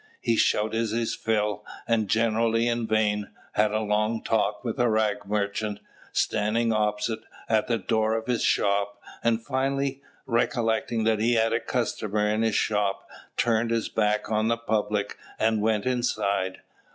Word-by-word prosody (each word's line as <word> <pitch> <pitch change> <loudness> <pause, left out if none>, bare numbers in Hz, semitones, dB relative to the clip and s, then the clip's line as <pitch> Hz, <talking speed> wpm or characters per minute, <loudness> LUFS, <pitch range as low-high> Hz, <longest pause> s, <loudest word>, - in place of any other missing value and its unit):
He 115 - +1
shouted 110 +1 +1
his 115 +1 -1
fill, 105 -2 -1 0.2
and 115 -3 +2
generally 115 +1 +2
in 120 -1 0
vain, 105 -1 +1 0.2
had 105 0 +2
a 110 +1 0
long 110 +1 0
talk 105 -1 0
with 120 +1 -3
a 120 -1 +3
rag 105 -2 0
merchant, 105 0 -1 0.3
standing 115 +2 +1
opposite, 105 +1 0 0.3
at 110 -1 +2
the 115 - +1
door 110 +2 +1
of 115 0 -3
his 125 -1 0
shop; 100 0 +1 0.2
and 115 -1 +1
finally, 135 0 -1 0.2
recollecting 115 -2 0
that 110 -1 +2
he 115 +3 +2
had 115 0 +2
a 115 - +2
customer 105 -3 -1
in 105 +1 +1
his 110 -2 +1
shop, 105 -2 0 0.3
turned 115 0 +2
his 115 -1 0
back 105 0 0
on 110 0 +2
the 115 0 +2
public 105 -2 -1 0.2
and 110 -1 +2
went 110 0 +1
inside. 105 -7 0
110 Hz, 155 wpm, -26 LUFS, 105-115 Hz, 0.3 s, a